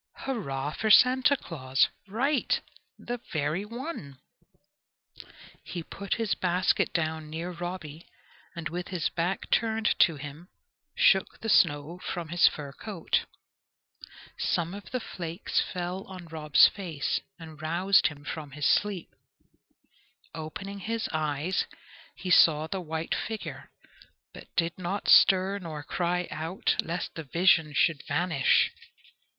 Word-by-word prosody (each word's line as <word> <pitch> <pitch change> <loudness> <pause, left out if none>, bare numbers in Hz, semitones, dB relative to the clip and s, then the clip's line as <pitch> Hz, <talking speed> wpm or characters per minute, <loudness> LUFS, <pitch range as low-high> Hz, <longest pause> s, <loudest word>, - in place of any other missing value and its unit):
"Hurrah 145 - -3
for 220 - -2
Santa 255 +5 +6
Claus!" 135 - +1 0.2
Right! 260 +7 +1 0.4
the 245 0 -5
very 155 +3 -1
one. 230 - -7 1.5
He 175 -2 -6
put 200 +4 -4
his 225 -2 0
basket 180 +1 +1
down 160 -2 -2
near 165 +3 -4
Robby, 175 -3 -7 0.5
and 170 -2 -4
with 175 +3 -5
his 180 -4 -1
back 175 +3 -2
turned 220 -1 +2
to 165 - +5
him 145 +5 -9 0.5
shook 190 -1 +3
the 225 - -3
snow 145 0 +3
from 175 -3 -5
his 175 +1 +5
fur 145 -2 -3
coat. 195 +1 -2 1.1
Some 170 +1 0
of 200 0 -9
the 255 - -2
flakes 170 -5 -2
fell 180 +1 -4
on 185 -2 -9
Rob's 155 -3 +5
face 165 -8 -2 0.2
and 160 -2 -11
roused 175 +3 +3
him 145 -2 -8
from 150 -3 -6
his 150 0 -3
sleep. 200 -5 +1 1.2
Opening 195 +6 -6
his 225 +3 -2
eyes, 155 +3 -1 0.5
he 185 - -4
saw 155 -3 +6
the 190 +3 -4
white 160 -1 -3
figure, 220 -1 -5 0.6
but - - -11
did 170 +1 0
not 185 +3 -3
stir 195 +1 +6
nor 155 -5 -6
cry 180 +2 -1
out, 160 +4 -1
lest 170 +2 -4
the 165 - -6
vision 165 +1 +3
should 155 -2 +3
vanish. 150 -2 +3
170 Hz, 130 wpm, -28 LUFS, 155-195 Hz, 1.5 s, Santa